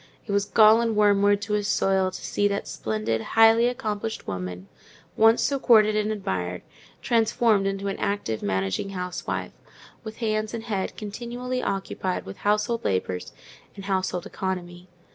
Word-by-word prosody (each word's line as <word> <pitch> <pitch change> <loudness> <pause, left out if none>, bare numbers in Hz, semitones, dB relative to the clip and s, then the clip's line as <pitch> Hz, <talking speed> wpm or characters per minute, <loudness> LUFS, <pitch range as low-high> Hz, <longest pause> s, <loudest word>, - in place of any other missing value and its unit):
It 210 - -5
was 200 0 +1
gall 220 +2 +6
and 230 -2 0
wormwood 205 -1 +4
to 210 +1 -3
his 205 -1 0
soul 190 -1 +2
to - - -8
see 205 - +1
that 200 0 -3
splendid, 110 +1 -2
highly 225 - +5
accomplished 220 -3 -3
woman, 90 0 -5 0.5
once 225 +1 +5
so 280 -1 0
courted 215 -4 +5
and 215 0 0
admired, 90 - -3 0.4
transformed 225 -3 +2
into 195 0 -3
an 195 - -3
active 155 - -2
managing 95 - -1
housewife, 180 0 -4 0.5
with 220 -1 -8
hands 215 -1 -1
and 225 - -6
head 205 -5 -3
continually 240 +4 -4
occupied 190 -1 -3
with 95 - -9
household 210 +3 0
labours 95 -1 -2 0.4
and 195 -1 -9
household 185 -2 -1
economy. 180 -1 -5
205 Hz, 150 wpm, -25 LUFS, 180-220 Hz, 0.5 s, gall